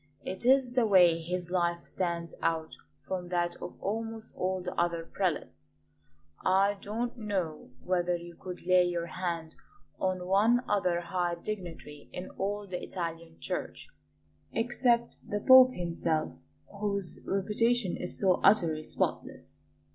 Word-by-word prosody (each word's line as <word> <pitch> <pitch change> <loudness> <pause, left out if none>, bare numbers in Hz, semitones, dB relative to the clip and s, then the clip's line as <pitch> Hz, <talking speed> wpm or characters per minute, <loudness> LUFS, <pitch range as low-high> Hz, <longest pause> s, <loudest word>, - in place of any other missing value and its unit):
It 190 +6 -3
is 265 -1 +5
the 245 -2 +2
way 175 -4 +6
his 175 +1 -4
life 170 -2 0
stands 170 -3 -2
out 160 -1 -1 0.3
from 180 -2 -3
that 175 -1 0
of - - -8
almost 225 +2 -4
all 185 0 -1
the 180 - -4
other 170 -1 0
prelates. 155 - -3 0.7
I 195 +2 +3
don't 235 +5 -3
know 185 -8 -3
whether 180 -1 +1
you 170 0 -10
could 180 0 -8
lay 185 0 +5
your 175 -1 -1
hand 170 -2 -4 0.5
on 185 -1 -1
one 215 +6 +4
other 180 -4 +1
high 175 0 -1
dignitary 170 -6 -7
in 180 - -6
all 205 +1 -3
the 180 -2 -5
Italian 165 -2 -5
Church - - -5 0.6
except 240 0 +1
the 205 - -1
Pope 255 +3 +8
himself 165 -2 -1 0.5
whose 200 -3 -2
reputation 210 +1 +1
is 180 - -3
so 185 -3 +3
utterly 170 -7 +4
spotless. 155 - -3
180 Hz, 135 wpm, -30 LUFS, 170-205 Hz, 0.7 s, Pope